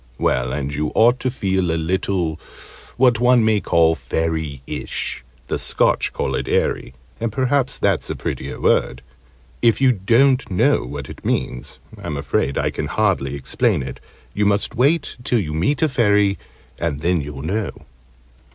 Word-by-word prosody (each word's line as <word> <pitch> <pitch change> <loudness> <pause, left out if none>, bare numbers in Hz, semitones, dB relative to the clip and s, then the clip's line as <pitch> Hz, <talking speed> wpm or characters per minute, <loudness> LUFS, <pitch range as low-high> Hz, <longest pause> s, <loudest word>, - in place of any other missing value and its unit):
Well, 65 0 0
and 70 +1 -3
you 75 +1 -2
ought 120 +3 +5
to 130 - -1
feel 95 -7 -1
a 80 - 0
little 85 -1 -1 0.6
what 125 -3 +4
one 125 -2 +4
may 110 -1 +3
call 80 -1 +3
"fairyish 80 -5 -3
" 65 -1 -32
the - - -2
Scotch - - +1
call - - -2
it - - -2
"eerie," 65 - 0 0.2
and 115 -1 -2
perhaps 130 +2 0
that's - - 0
a - - -2
prettier - - -5
word; 60 +1 +1 0.6
if 115 -3 +3
you 135 -1 +5
don't 125 +6 +3
know 90 -9 +2
what 70 0 -6
it - - -11
means, 60 - -2 0.2
I'm 75 - -4
afraid 70 0 -1
I - - 0
can - - -3
hardly 70 +1 0
explain 70 - 0
it; - - -7 0.3
you 105 0 +1
must 100 +2 +1
wait 140 +6 +1
till 120 - +1
you 80 -8 -2
meet 130 - +1
a - - +5
Fairy, 105 -6 +2 0.4
and 75 -4 -2
then 85 0 +1
you'll 70 -1 -7
know. 100 +6 -1
95 Hz, 165 wpm, -20 LUFS, 75-120 Hz, 0.6 s, ought